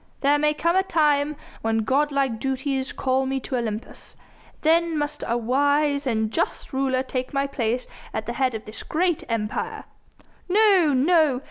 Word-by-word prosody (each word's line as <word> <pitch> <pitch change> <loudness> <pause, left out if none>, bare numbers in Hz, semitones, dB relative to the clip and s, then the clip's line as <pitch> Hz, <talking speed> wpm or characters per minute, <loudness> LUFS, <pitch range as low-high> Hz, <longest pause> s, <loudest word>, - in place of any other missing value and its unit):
There 290 +1 +3
may 300 0 +2
come 335 +3 +1
a 380 - +5
time 300 -5 +1 0.3
when 225 0 0
god 290 +6 +1
like 270 -5 0
duties 265 0 -2
call 265 0 0
me 270 0 -1
to 255 - -4
Olympus. 225 -2 -5 0.5
Then 330 0 +3
must 295 0 -3
a 235 - +1
wise 285 +4 +1
and 220 -3 0
just 325 - -2
ruler 265 -1 +1
take 255 0 -4
my 275 0 +2
place 250 -2 -1 0.3
at 220 0 -4
the 235 - -3
head 255 -1 0
of 220 - -6
this 215 - -8
great 345 0 0
Empire." 215 -2 -3 0.7
"No! 385 -5 +5
no! 300 -1 +3
275 Hz, 165 wpm, -24 LUFS, 250-300 Hz, 0.7 s, a